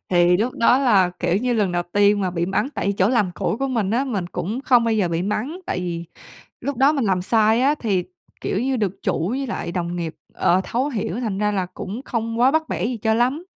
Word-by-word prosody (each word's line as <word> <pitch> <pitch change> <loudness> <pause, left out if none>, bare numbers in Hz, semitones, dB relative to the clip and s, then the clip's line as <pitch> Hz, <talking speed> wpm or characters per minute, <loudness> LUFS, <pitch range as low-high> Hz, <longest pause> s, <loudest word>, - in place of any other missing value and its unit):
Thì 175 0 +4
lúc 235 +6 0
đó 245 +2 +4
là, 200 -9 +4
kiểu 175 - +1
như, 245 +3 0
lần 205 -5 +1
đầu 175 0 0
tiên 205 0 +4
mà 185 -2 0
bị 170 0 -1
mắng. 195 +7 0
Tại 200 - 0
chỗ 190 +3 +4
làm 220 -7 +2
cũ - - -1
của 275 - -1
mình 225 -6 0
á, 250 +5 +1
mình 200 -9 -2
cũng 210 +8 -4
không 245 -4 +4
bao 230 -1 +1
giờ 195 -5 +1
bị 170 +1 -1
mắng, 250 - -3
tại - - -2
vì 170 -1 -4 0.6
lúc 280 -3 -3
đó 275 +3 +5
mình 275 -7 0
làm 185 -2 +1
sai 220 +3 +3
á 280 +3 +3
thì, 200 -10 0 0.4
kiểu 195 - -1
như, 260 +1 0
được 200 -4 -2
chủ 165 +4 0
với 270 +3 -2
lại 200 - -4
đồng 175 -1 -3
nghiệp, 165 -2 -4 0.2
ờ, 180 +2 +2
thấu 260 +5 -1
hiểu, 220 -4 -3
thành 215 -6 -2
ra 210 0 +1
là 190 -3 -1
cũng 210 +7 -6
không 230 -1 -3
quá 255 +2 +5
bắt 315 +1 0
bẻ - - -1
gì 245 0 -2
cho 220 +1 +1
lắm. 255 +9 +1
215 Hz, 250 wpm, -22 LUFS, 185-250 Hz, 0.6 s, đó